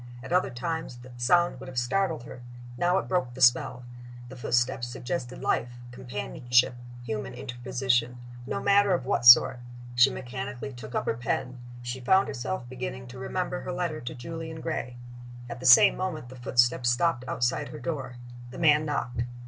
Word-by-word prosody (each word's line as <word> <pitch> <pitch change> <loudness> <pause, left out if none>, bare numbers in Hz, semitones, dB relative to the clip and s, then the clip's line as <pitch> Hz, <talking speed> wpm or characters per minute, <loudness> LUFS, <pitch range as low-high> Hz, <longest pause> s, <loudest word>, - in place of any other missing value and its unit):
At - - -5
other 180 - +3
times 160 +1 -4
the 125 +1 -13
sound 150 +5 +2
would 135 +1 -9
have 130 - -10
startled 160 +4 0
her: 125 - -10 0.3
now 175 +7 +2
it - - -2
broke 130 -10 -1
the - - -9
spell. 125 0 +3 0.5
The 130 - -10
footsteps 120 0 0
suggested 125 +1 -5
life, 120 0 -1
companionship, 125 0 0 0.3
human 110 -1 -5
interposition 125 0 -1 0.3
no - - -2
matter 200 -1 +4
of 150 - -4
what 120 -2 +1
sort. 120 +1 +9 0.3
She 120 +2 +6
mechanically 130 +1 -6
took 120 -1 -9
up - - -1
her - - +1
pen; 125 +2 -3 0.2
she 120 +2 -4
found 190 +10 +3
herself 130 +1 -4
beginning 125 0 -6
to 125 +1 -10
remember 180 +6 -3
her - - -5
letter 175 -3 -3
to 120 - -6
Julian 160 +5 -7
Gray. 125 -7 -4 0.5
At 120 0 -7
the 130 - -1
same 195 +11 +8
moment 160 -9 -4
the 130 - -11
footsteps 120 -1 +2
stopped 125 +1 +1
outside 125 +4 -1
her 150 - -8
door. 140 -6 -4 0.3
The 125 - -10
man 155 -2 +4
knocked. 125 -5 -2
125 Hz, 175 wpm, -27 LUFS, 120-160 Hz, 0.5 s, sort